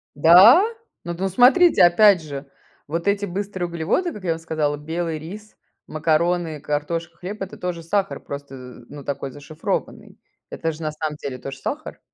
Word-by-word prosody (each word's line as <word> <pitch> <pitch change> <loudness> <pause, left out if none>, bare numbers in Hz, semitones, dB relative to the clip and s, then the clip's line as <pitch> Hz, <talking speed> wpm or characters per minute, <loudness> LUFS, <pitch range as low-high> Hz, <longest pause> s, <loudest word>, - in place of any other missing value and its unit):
Да? 185 - +8 0.4
Ну, 170 - -4
д 170 - -9
ну 195 - 0
смотрите, 255 - +5
опять 185 +1 +6
же, 140 -2 -8 0.4
вот 170 +5 -3
эти 200 0 +1
быстрые 190 -1 -4
углеводы, 175 - -1
как 200 - -10
я 170 - 0
вам 165 - -2
сказала: 155 -3 -2
белый 160 +1 -4
рис, 205 +7 -10 0.3
макароны, 160 +1 0
картошка, 165 +4 -3
хлеб- 195 +4 -7
это 195 - -6
тоже 175 -2 -4
сахар, 195 +4 -1
просто, 140 -1 -8
э, 125 -2 -12
ну, 145 -1 -10
такой 140 -1 -4
зашифрованный. 150 +3 -5 0.3
Это 165 - -3
же 160 +1 -11
на 155 - -2
самом 155 0 -4
деле 135 -3 -6
тоже 135 +2 -8
сахар. 295 - -6
165 Hz, 175 wpm, -22 LUFS, 150-190 Hz, 0.4 s, Да